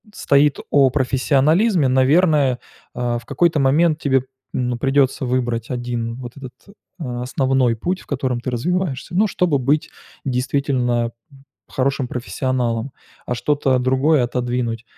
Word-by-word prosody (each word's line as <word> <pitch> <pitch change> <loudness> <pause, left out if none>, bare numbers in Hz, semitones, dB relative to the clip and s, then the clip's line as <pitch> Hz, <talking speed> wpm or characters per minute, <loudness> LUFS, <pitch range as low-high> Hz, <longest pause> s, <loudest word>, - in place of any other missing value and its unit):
стоит 140 0 +3
о 140 -2 +5
профессионализме, 145 - +2
наверное, 135 +1 +3 0.4
а, 120 -1 -1
в 120 - -17
какой-то 170 +1 +1
момент 155 +4 +3
тебе, 135 -4 +1 0.3
ну, 125 -1 -1
придется 135 0 +1
выбрать 120 -2 -1
1 120 -2 -3
вот 120 0 -9
этот, 130 -3 -9 0.5
а, 125 -6 -4
основной 130 -1 +1
путь, 180 +11 -2
в - - -19
котором 130 -3 -2
ты 125 - -4
развиваешься, 155 +3 -2
ну, 210 +4 +4
чтобы 175 -7 +1
быть 145 +4 0 0.3
действительно 125 -2 0
б - - -20 0.6
хорошим 135 -1 -1
профессионалом, 125 -1 -2 0.3
а, 125 - -2
что-то 135 0 +1
другое 130 +3 +2
отодвинуть. 120 -2 -2
130 Hz, 130 wpm, -20 LUFS, 125-145 Hz, 0.6 s, о